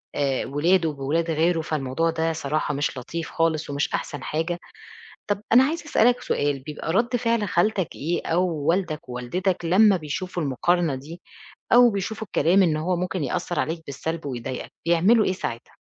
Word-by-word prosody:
آآ 135 Hz, -2 st, 0 dB
ولاده 165 Hz, +4 st, +2 dB
بولاد 150 Hz, +4 st, -1 dB
غيره، 165 Hz, +2 st, +2 dB
فالموضوع 155 Hz, +1 st, -1 dB
ده 165 Hz, 0 st, 0 dB
صراحة 155 Hz, -1 st, -1 dB
مش 145 Hz, -1 st, -2 dB
لطيف 160 Hz, +6 st, -5 dB
خالص 165 Hz, -2 st, 0 dB
ومش 140 Hz, +1 st, -1 dB
أحسن 145 Hz, -, -3 dB
حاجة، 165 Hz, +3 st, -2 dB, 0.7 s
طب 205 Hz, 0 st, -1 dB
أنا 255 Hz, +3 st, +8 dB
عايزة 320 Hz, +3 st, -2 dB
أسألك 245 Hz, -4 st, +3 dB
سؤال، 145 Hz, -1 st, 0 dB
بيبقى 150 Hz, +2 st, -5 dB
رد 235 Hz, +5 st, +2 dB
فعل 230 Hz, -3 st, 0 dB
خالتك 190 Hz, 0 st, +1 dB
إيه 170 Hz, +4 st, -2 dB
أو 175 Hz, +3 st, +2 dB, 0.2 s
والدك 170 Hz, -4 st, 0 dB
ووالدتك 175 Hz, +10 st, -2 dB
لمّا 195 Hz, +4 st, +5 dB
بيشوفوا 175 Hz, +2 st, -4 dB
المقارنة 160 Hz, +3 st, +1 dB
دي، 155 Hz, +7 st, -9 dB, 0.5 s
أو 245 Hz, 0 st, +8 dB
بيشوفوا 210 Hz, +2 st, -4 dB
الكلام 190 Hz, +2 st, +3 dB
إن 160 Hz, -4 st, +2 dB
هو 175 Hz, +4 st, 0 dB
ممكن 180 Hz, -2 st, -2 dB
يأثّر 170 Hz, +6 st, -2 dB
عليك 160 Hz, +1 st, -3 dB
بالسلب 160 Hz, +3 st, -4 dB
ويضايقك، 130 Hz, 0 st, -5 dB
بيعملوا 190 Hz, +7 st, +4 dB
إيه -, -, +1 dB
ساعتها؟ 120 Hz, -10 st, -6 dB
165 Hz, 160 wpm, -24 LUFS, 150-185 Hz, 0.7 s, أنا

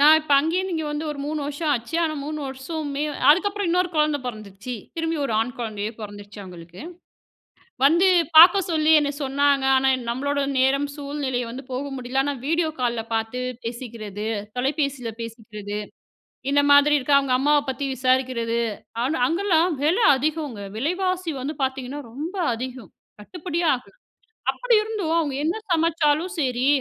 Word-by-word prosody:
நான் 305 Hz, +2 st, +8 dB
இப்ப, 310 Hz, -2 st, -2 dB
அங்கேந்து 355 Hz, +5 st, -1 dB
இங்க 320 Hz, -1 st, -2 dB
வந்து 295 Hz, +1 st, -3 dB
ஒரு 295 Hz, -, -6 dB
3 300 Hz, +1 st, -3 dB
வருஷம் 295 Hz, +2 st, -2 dB
ஆச்சு. 245 Hz, +4 st, -3 dB
ஆனா 315 Hz, -2 st, 0 dB
3 305 Hz, +1 st, -4 dB
வருஷமே 280 Hz, +2 st, -4 dB, 0.3 s
அதுக்கப்புறம் 405 Hz, +5 st, +2 dB
இன்னொரு 360 Hz, +1 st, +2 dB
குழந்த 300 Hz, -1 st, +2 dB
பொறந்துச்சு. 215 Hz, +1 st, -7 dB, 0.2 s
திரும்பி 325 Hz, 0 st, -1 dB
ஒரு 270 Hz, -, -2 dB
ஆண் 240 Hz, +3 st, -2 dB
குழந்தயே 215 Hz, -3 st, -3 dB
பொறந்துடுச்சு. 205 Hz, 0 st, -9 dB
அவங்களுக்கு 175 Hz, 0 st, -11 dB, 1.0 s
வந்து 340 Hz, +6 st, +5 dB, 0.3 s
பாக்கச் 355 Hz, +3 st, +8 dB
சொல்லி 310 Hz, -1 st, +3 dB
என்ன 290 Hz, -1 st, 0 dB
சொன்னாங்க. 275 Hz, 0 st, +2 dB
ஆனா 265 Hz, 0 st, +3 dB
எ -, -, -5 dB
நம்மளோட 285 Hz, +4 st, -1 dB, 0.2 s
நேரம் 275 Hz, +2 st, +2 dB
சூழ்நிலை 280 Hz, -3 st, -3 dB
வந்து 255 Hz, +4 st, -7 dB
போக 255 Hz, +2 st, -2 dB
முடியல. 255 Hz, +1 st, -1 dB
ஆனா 285 Hz, 0 st, -2 dB
விடியோ 330 Hz, +1 st, +1 dB
கால்ல 240 Hz, -2 st, 0 dB
பாத்து 225 Hz, +3 st, -2 dB, 0.2 s
பேசிக்குறது, 225 Hz, -3 st, -6 dB, 0.3 s
தொலைபேசியில 270 Hz, -3 st, -1 dB
பேசிக்குறது. 210 Hz, -3 st, -7 dB, 0.7 s
இந்த 285 Hz, -, +5 dB
மாதிரி 285 Hz, +1 st, +6 dB
இருக்க 280 Hz, +1 st, +1 dB
அவங்க 270 Hz, -2 st, 0 dB
அம்மாவ 290 Hz, +2 st, +3 dB
பத்தி 275 Hz, +2 st, -3 dB
விசாரிக்குறது. 255 Hz, -2 st, +1 dB, 0.4 s
ஆனா 295 Hz, +5 st, 0 dB
அங்கலாம் 340 Hz, -2 st, +2 dB
வில 325 Hz, +7 st, +3 dB, 0.2 s
அதிகங்க. 295 Hz, -4 st, -2 dB, 0.2 s
விலைவாசி 365 Hz, +5 st, -1 dB
வந்து 290 Hz, +4 st, -3 dB
பாத்தீங்கன்னா 265 Hz, +2 st, -3 dB
ரொம்ப 315 Hz, +10 st, -5 dB, 0.2 s
அதிகம். 245 Hz, -4 st, -7 dB, 0.3 s
கட்டுப்படியே 340 Hz, -, -4 dB
ஆகல. 250 Hz, 0 st, -9 dB, 0.6 s
அப்டி -, -, 0 dB
இருந்தும் 420 Hz, -7 st, -2 dB
அவங்க 305 Hz, -5 st, 0 dB
என்ன 335 Hz, +6 st, 0 dB, 0.2 s
சமைச்சாலும் 330 Hz, 0 st, +2 dB
சரி. 255 Hz, -2 st, 0 dB
280 Hz, 150 wpm, -23 LUFS, 245-320 Hz, 1.0 s, நான்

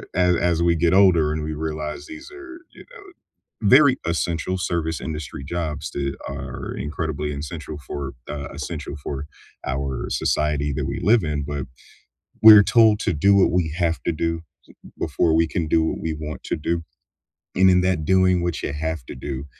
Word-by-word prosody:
a 90 Hz, -, +3 dB, 0.3 s
as 85 Hz, -, 0 dB
we 85 Hz, -1 st, +3 dB
get 85 Hz, +2 st, +2 dB
older 90 Hz, -6 st, +5 dB
and 75 Hz, 0 st, -3 dB
we 80 Hz, 0 st, -3 dB
realize 75 Hz, -1 st, -5 dB
these 320 Hz, +2 st, -10 dB
are, 350 Hz, -2 st, -11 dB
you -, -, -13 dB
know, 470 Hz, -5 st, -13 dB, 0.7 s
very 135 Hz, +1 st, +6 dB
essential 85 Hz, +1 st, -1 dB
service 85 Hz, -3 st, -2 dB
industry 75 Hz, -3 st, -6 dB
jobs 80 Hz, -1 st, -4 dB
that 70 Hz, -1 st, -3 dB
are -, -, -6 dB
incredibly 75 Hz, -1 st, -3 dB
essential 75 Hz, +1 st, -6 dB
for, 70 Hz, -1 st, -5 dB, 0.2 s
uh, 70 Hz, -2 st, -5 dB
essential -, -, -6 dB
for 70 Hz, +1 st, -5 dB, 0.4 s
our 65 Hz, -1 st, -3 dB
society 75 Hz, -1 st, 0 dB
that -, -, -2 dB
we -, -, -3 dB
live 110 Hz, -2 st, +4 dB
in, 75 Hz, -2 st, -2 dB
but, 70 Hz, -2 st, -4 dB, 0.8 s
we're 105 Hz, -2 st, +11 dB
told 110 Hz, -2 st, +5 dB
to -, -, 0 dB
do 100 Hz, +7 st, +3 dB
what 100 Hz, -, +4 dB
we 90 Hz, -3 st, +1 dB
have 85 Hz, +1 st, -1 dB
to -, -, 0 dB
do 85 Hz, +1 st, -2 dB, 0.4 s
so, -, -, -13 dB
uh, -, -, -26 dB
before 80 Hz, -, +1 dB
we 80 Hz, 0 st, +3 dB
can 80 Hz, -1 st, -2 dB
do 80 Hz, +1 st, +3 dB
what 80 Hz, -, -2 dB
we 80 Hz, -, -2 dB
want 75 Hz, 0 st, -7 dB
to -, -, -2 dB
do. 85 Hz, +2 st, -2 dB, 0.7 s
And 95 Hz, 0 st, +6 dB
in 90 Hz, -, +4 dB
that 90 Hz, -4 st, 0 dB
doing 95 Hz, -1 st, +3 dB
what 85 Hz, -4 st, -2 dB
you -, -, -2 dB
have 80 Hz, -2 st, -3 dB
to -, -, -8 dB
do, 65 Hz, +1 st, -6 dB
80 Hz, 185 wpm, -22 LUFS, 75-90 Hz, 0.8 s, we're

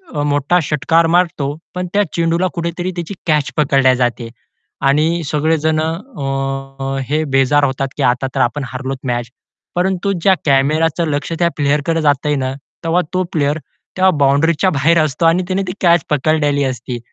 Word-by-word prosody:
अ, 145 Hz, -, 0 dB
मोठा 145 Hz, +4 st, +2 dB
षटकार 165 Hz, +3 st, +2 dB
मारतो. 155 Hz, -5 st, 0 dB, 0.2 s
पण 180 Hz, 0 st, -3 dB
त्या 205 Hz, 0 st, +3 dB
चेंडूला 170 Hz, +2 st, +1 dB
कुठेतरी 170 Hz, +2 st, -3 dB
त्याची 175 Hz, +3 st, -5 dB
कॅच 150 Hz, -3 st, +1 dB
पकडली 135 Hz, -3 st, +3 dB
जाते. 120 Hz, -2 st, -1 dB, 0.6 s
आणि 160 Hz, +4 st, +2 dB
सगळे 155 Hz, +2 st, +1 dB
जणं 160 Hz, +1 st, 0 dB
अ, 135 Hz, -, -4 dB
अ, -, -, -2 dB
हे 155 Hz, +2 st, +1 dB
बेजार 140 Hz, +2 st, +3 dB
होतात 135 Hz, 0 st, -1 dB
की 145 Hz, -, -1 dB
आता 125 Hz, +1 st, +1 dB
तर -, -, 0 dB
आपण 135 Hz, +4 st, 0 dB
हरलोत 130 Hz, +1 st, -4 dB
मॅच. 120 Hz, -1 st, -2 dB, 0.5 s
परंतु 190 Hz, +2 st, 0 dB
ज्या 190 Hz, +3 st, +5 dB
कॅमेराच 155 Hz, +4 st, +2 dB
लक्ष 145 Hz, +2 st, -2 dB
त्या 170 Hz, -1 st, +3 dB
प्लेयरकडे 150 Hz, +3 st, +1 dB
जातंय 145 Hz, 0 st, +1 dB
ना 130 Hz, -1 st, -2 dB, 0.3 s
तेव्हा 165 Hz, +2 st, +2 dB
तो 185 Hz, -, +1 dB
प्लेयर 145 Hz, -1 st, +1 dB, 0.4 s
तेव्हा 190 Hz, 0 st, +5 dB
बाउंडरीच्या 150 Hz, +6 st, +3 dB
बाहेर 155 Hz, +3 st, +3 dB
असतो 155 Hz, +2 st, -1 dB
आणि 165 Hz, +3 st, +3 dB
त्याने 190 Hz, +1 st, 0 dB
ती 180 Hz, -, -3 dB
कॅच 170 Hz, -1 st, +4 dB
पकडलेली 145 Hz, -1 st, +1 dB
असती. 125 Hz, -2 st, -4 dB
150 Hz, 165 wpm, -17 LUFS, 135-170 Hz, 0.6 s, ज्या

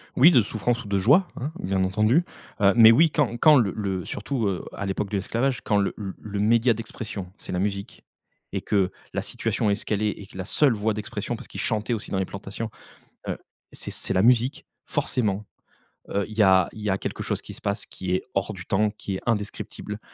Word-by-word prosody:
Oui, 150 Hz, +8 st, +8 dB
de 125 Hz, -, +6 dB
souffrance 115 Hz, +3 st, -1 dB
ou -, -, -10 dB
de 100 Hz, -1 st, +1 dB
joie, 140 Hz, -, +5 dB
hein, 140 Hz, +5 st, -3 dB
bien 95 Hz, 0 st, 0 dB
entendu, 110 Hz, -, +3 dB, 0.4 s
heu, 100 Hz, 0 st, +6 dB
mais 115 Hz, -1 st, +9 dB
oui, 160 Hz, +7 st, +6 dB
quand 120 Hz, -6 st, +1 dB
quand 155 Hz, +3 st, +7 dB
le 110 Hz, -7 st, +3 dB
le 95 Hz, -4 st, -2 dB
surtout, 110 Hz, 0 st, -2 dB
heu, 95 Hz, -2 st, -2 dB
à 100 Hz, -, -4 dB
l'époque 95 Hz, +1 st, -2 dB
de 100 Hz, -, -1 dB
l'esclavage, 120 Hz, +7 st, -1 dB
quand 105 Hz, -, +1 dB
le 100 Hz, -1 st, +1 dB
le 100 Hz, 0 st, -6 dB
média 115 Hz, +3 st, +4 dB
d'expression, 105 Hz, -4 st, -7 dB
c'est -, -, -8 dB
la 90 Hz, -, -1 dB
musique, 100 Hz, 0 st, -3 dB, 0.5 s
et -, -, -1 dB
que 95 Hz, -2 st, +1 dB, 0.2 s
la -, -, -1 dB
situation 105 Hz, -, -1 dB
est 100 Hz, -, +3 dB
ce 105 Hz, -, -6 dB
qu'elle 105 Hz, -1 st, -1 dB
est 105 Hz, -, +2 dB
et 100 Hz, -, -9 dB
que 95 Hz, -, -13 dB
la 95 Hz, -, -4 dB
seule 135 Hz, +4 st, +4 dB
voix 110 Hz, +1 st, 0 dB
d'expression, 105 Hz, 0 st, -4 dB
parce -, -, -10 dB
qu'ils -, -, -8 dB
chantaient 110 Hz, +2 st, 0 dB
aussi 110 Hz, -, -5 dB
dans 95 Hz, -, 0 dB
les 95 Hz, -, 0 dB
plantations, 100 Hz, +4 st, -6 dB, 0.6 s
heu, -, -, -1 dB, 0.4 s
c'est -, -, -6 dB
c'est -, -, -2 dB
la 95 Hz, -, +3 dB
musique, 125 Hz, +3 st, +3 dB, 0.2 s
forcément, 105 Hz, -4 st, 0 dB, 0.7 s
heu, 100 Hz, 0 st, 0 dB
il 110 Hz, 0 st, -10 dB
y 110 Hz, -, +6 dB
a 95 Hz, -2 st, +5 dB
il 110 Hz, -, -10 dB
y 105 Hz, -, -1 dB
a 95 Hz, -, +2 dB
quelque -, -, -4 dB
chose -, -, -2 dB
qui -, -, -10 dB
se -, -, -12 dB
passe, 100 Hz, +2 st, -2 dB
qui 95 Hz, -1 st, -6 dB
est -, -, -1 dB
hors 95 Hz, -, -1 dB
du 90 Hz, -, -9 dB
temps, 105 Hz, +1 st, +2 dB
qui 100 Hz, -2 st, -5 dB
est -, -, -5 dB
indescriptible, 105 Hz, -1 st, -3 dB
105 Hz, 230 wpm, -25 LUFS, 100-115 Hz, 0.7 s, mais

